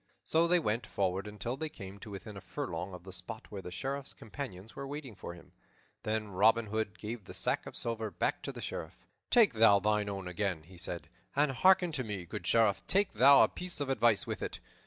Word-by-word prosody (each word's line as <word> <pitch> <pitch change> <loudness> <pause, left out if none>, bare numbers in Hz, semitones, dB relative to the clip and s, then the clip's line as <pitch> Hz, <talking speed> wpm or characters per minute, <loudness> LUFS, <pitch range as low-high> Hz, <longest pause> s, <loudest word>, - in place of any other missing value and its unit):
So 165 +1 +3
they 180 +1 +5
went 110 -7 -1
forward 95 +1 -1
until 105 +4 -4
they 155 +3 -3
came 100 -8 -9
to 105 - -9
within 100 +1 -8
a 95 - -8
furlong 90 +3 -4
of 90 - -11
the 95 0 -9
spot - - -7
where 100 -2 -5
the 90 - -7
Sheriff's 135 +9 -4
companions 110 -4 -8
were 140 - -5
waiting 140 -4 -6
for 90 -3 -8
him. 85 - -16 0.5
Then 110 -1 -2
Robin 110 +4 +4
Hood 110 0 -2
gave 110 -1 -6
the - - -9
sack - - 0
of - - -7
silver 115 -2 -2
back - - -1
to - - -4
the - - -8
Sheriff. - - -5 0.3
"Take 230 - +6
thou 110 -2 +7
thine 105 0 +1
own 95 -2 -4
again," 90 -2 -1
he 90 +2 -14
said, 90 -2 -4 0.3
"and 145 0 +3
hearken 180 +5 +5
to 135 -4 0
me, 105 -5 -4
good 85 +1 -6
Sheriff, 105 -5 +4
take 200 +1 +3
thou 135 +5 +8
a - - +5
piece 180 -3 -2
of 145 -2 -2
advice 120 -5 +3
with - - -4
it. - - -4
110 Hz, 220 wpm, -32 LUFS, 95-135 Hz, 0.5 s, thou